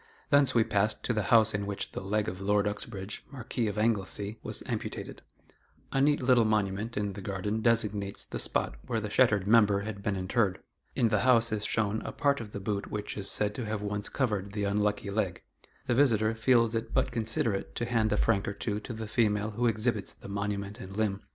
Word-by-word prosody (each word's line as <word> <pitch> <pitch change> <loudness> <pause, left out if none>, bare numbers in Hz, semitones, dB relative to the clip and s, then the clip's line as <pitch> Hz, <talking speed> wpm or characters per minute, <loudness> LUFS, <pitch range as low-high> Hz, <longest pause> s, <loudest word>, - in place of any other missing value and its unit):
Thence 140 -2 +4
we 115 - +6
passed 105 0 0
to 125 - 0
the 110 - +1
house 110 -2 +5
in 100 -1 -2
which 100 -1 -4
the - - -5
leg 105 +2 -1
of 90 +1 -5
Lord 105 +1 +2
Uxbridge 105 -1 -5
(Marquis 125 -4 -3
of 105 0 -3
Anglesey) 105 -1 0
was - - -6
amputated. - - -5 0.7
A 135 - +1
neat 145 -1 +3
little 125 -2 +5
monument 105 +1 0
in 105 -1 -1
the 100 - -7
garden 100 +3 -2
designates 105 -4 +1
the - - -5
spot - - -1
where 115 - 0
the 105 -1 -5
shattered 105 -7 +3
member 105 -2 +5
had 100 -1 -5
been 100 0 -1
interred. 95 +1 0 0.4
In 115 - +3
the 105 -1 +2
house 115 -1 +4
is 105 -1 -1
shown 110 -1 0
a - - -5
part 140 -3 +1
of 105 -2 -8
the 100 - -5
boot 100 0 -3
which 105 -1 -4
is 100 -1 -4
said 105 -1 0
to 120 - -4
have 105 -1 -3
once 105 0 -3
covered 105 -7 -1
the 105 -1 -2
unlucky 105 0 0
leg. 100 -3 -2 0.4
The 125 - +1
visitor 115 -5 +3
feels 115 0 +3
it 115 0 -3
but - - +2
considerate 115 -2 -1
to 120 - -1
hand 115 -2 +1
a 105 - +2
franc 105 -3 +2
or 100 - -2
two 105 0 -3
to 120 - -7
the 110 -1 -5
female 105 -1 +1
who 120 +3 0
exhibits 110 -1 0
the - - -12
monument 100 +1 -3
and 95 -2 -8
limb. 105 -2 0
105 Hz, 215 wpm, -29 LUFS, 100-115 Hz, 0.7 s, we